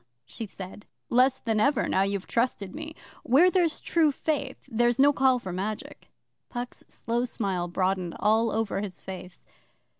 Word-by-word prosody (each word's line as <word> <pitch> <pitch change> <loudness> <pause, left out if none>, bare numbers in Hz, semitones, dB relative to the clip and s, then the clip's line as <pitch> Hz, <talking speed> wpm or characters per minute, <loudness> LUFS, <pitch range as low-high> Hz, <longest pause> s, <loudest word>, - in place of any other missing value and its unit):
she 220 - -5
said. 195 +2 -10 0.2
'Less 255 +2 +4
than 220 -2 0
ever 280 +3 +2
now 190 - +2
you've 195 0 -1
trusted 230 -5 -1
me. 310 +1 -7 0.3
Where 315 +9 +5
there's 345 -5 +2
true 320 -3 +2
faith, 295 0 -3
there's 240 -1 +2
no 285 +2 +6
call 265 -2 +4
for 190 -7 -6
magic.' 205 +4 -5 0.4
Puck's 245 0 -6
slow 235 +1 -2
smile 195 -7 -2
broadened 185 -1 -1
all 220 +2 +3
over 220 -3 -1
his 195 -3 -6
face. 185 -1 -9
225 Hz, 155 wpm, -27 LUFS, 195-265 Hz, 0.4 s, no